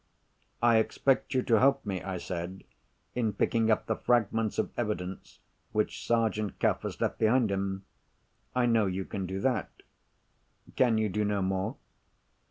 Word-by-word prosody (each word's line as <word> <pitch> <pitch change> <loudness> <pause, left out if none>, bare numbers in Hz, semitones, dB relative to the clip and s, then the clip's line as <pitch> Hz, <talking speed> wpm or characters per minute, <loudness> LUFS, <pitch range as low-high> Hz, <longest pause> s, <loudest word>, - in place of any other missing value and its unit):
"I 120 -1 +6
expect 130 +4 +1
you 130 - +2
to 115 -3 +3
help 135 0 +3
me," 95 -3 -2
I 95 -1 -4
said, 90 +1 -5 0.5
"in 115 -4 0
picking 115 +2 +1
up 110 - +2
the 110 - 0
fragments 115 -2 +1
of - - 0
evidence 95 -5 -4 0.4
which - - -1
Sergeant 110 -3 0
Cuff - - +2
has - - -5
left - - -1
behind 115 0 +3
him. 95 0 -2 0.7
I 125 -1 +3
know 115 -4 +3
you 95 0 -2
can 95 -3 -4
do 95 +1 -3
that. 130 +2 0 1.1
Can 120 -4 +3
you 110 0 +2
do 105 +2 -1
no 105 -1 0
more?" 95 0 -1
110 Hz, 160 wpm, -29 LUFS, 95-115 Hz, 1.1 s, I